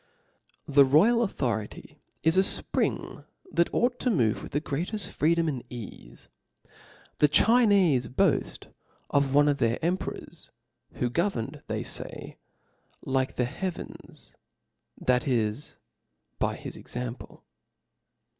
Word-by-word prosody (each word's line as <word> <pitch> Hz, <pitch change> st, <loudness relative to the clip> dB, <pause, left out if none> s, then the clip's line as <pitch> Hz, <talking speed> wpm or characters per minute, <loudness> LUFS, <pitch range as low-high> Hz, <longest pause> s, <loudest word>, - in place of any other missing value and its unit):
TH 145 Hz, 0 st, +2 dB
E -, -, +11 dB
royal 165 Hz, -, +5 dB
authority 120 Hz, -, -3 dB, 0.2 s
is 160 Hz, +2 st, +4 dB
a -, -, +5 dB, 0.2 s
fpring -, -, -2 dB, 0.3 s
that 170 Hz, -, +2 dB
ought 245 Hz, +1 st, +1 dB
to 255 Hz, -, 0 dB
move 120 Hz, -, +1 dB
with -, -, -9 dB
the 145 Hz, -, 0 dB
greateft 175 Hz, +8 st, -4 dB
freedom 165 Hz, +2 st, +2 dB
and 135 Hz, -6 st, -3 dB
eafe. 120 Hz, -5 st, -10 dB, 0.9 s
The 150 Hz, -, +5 dB
Chincfe 195 Hz, -, +4 dB
boaft -, -, +1 dB, 0.4 s
of 140 Hz, -1 st, +2 dB
one 145 Hz, 0 st, +6 dB
of 145 Hz, -1 st, +1 dB
their 115 Hz, 0 st, +2 dB
emperors^ 180 Hz, +3 st, -4 dB, 0.4 s
who 120 Hz, -1 st, -2 dB
governed, 170 Hz, -, -2 dB
they -, -, -2 dB
fay, -, -, -7 dB, 0.7 s
like 130 Hz, 0 st, 0 dB
the 125 Hz, -, +1 dB
heavens, 180 Hz, +8 st, -7 dB, 0.7 s
that 125 Hz, +1 st, +1 dB
is, 115 Hz, +1 st, -1 dB, 0.6 s
by -, -, 0 dB
his -, -, -8 dB
example. 125 Hz, 0 st, -7 dB
145 Hz, 120 wpm, -27 LUFS, 125-180 Hz, 0.9 s, E